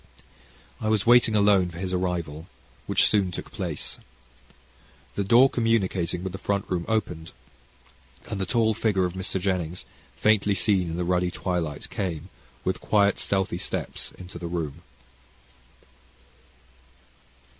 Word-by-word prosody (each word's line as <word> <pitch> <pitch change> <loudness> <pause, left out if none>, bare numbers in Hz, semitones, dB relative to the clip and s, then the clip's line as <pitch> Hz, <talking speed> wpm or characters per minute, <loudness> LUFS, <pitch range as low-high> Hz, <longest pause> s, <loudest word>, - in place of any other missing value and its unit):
I 110 - -1
was 110 -3 +2
waiting 120 -2 +6
alone 100 -3 +4
for 85 - -10
his 95 +1 -3
arrival, 85 -3 -2 0.4
which - - +4
soon 100 -3 +2
took 90 - -7
place. - - -4 1.1
The 100 - -1
door 120 +7 +6
communicating 100 -8 0
with 95 - -3
the 95 - -6
front 100 -1 -1
room 85 -2 -2
opened, 90 -7 -2 0.9
and 100 - -3
the 95 - -1
tall 115 -2 +2
figure 105 -3 +1
of 90 - -3
Mr. 95 +1 -2
Jennings, 90 -2 -2 0.3
faintly 105 -2 +3
seen 95 -3 +2
in 80 - -4
the 90 - -1
ruddy 90 0 +1
twilight, 85 -5 -3
came, 90 -2 -3 0.3
with - - -1
quiet 100 -1 +3
stealthy 95 -3 -1
steps, - - -4
into 90 -2 -9
the 85 - -4
room. 85 -5 -4
95 Hz, 135 wpm, -26 LUFS, 90-105 Hz, 1.1 s, waiting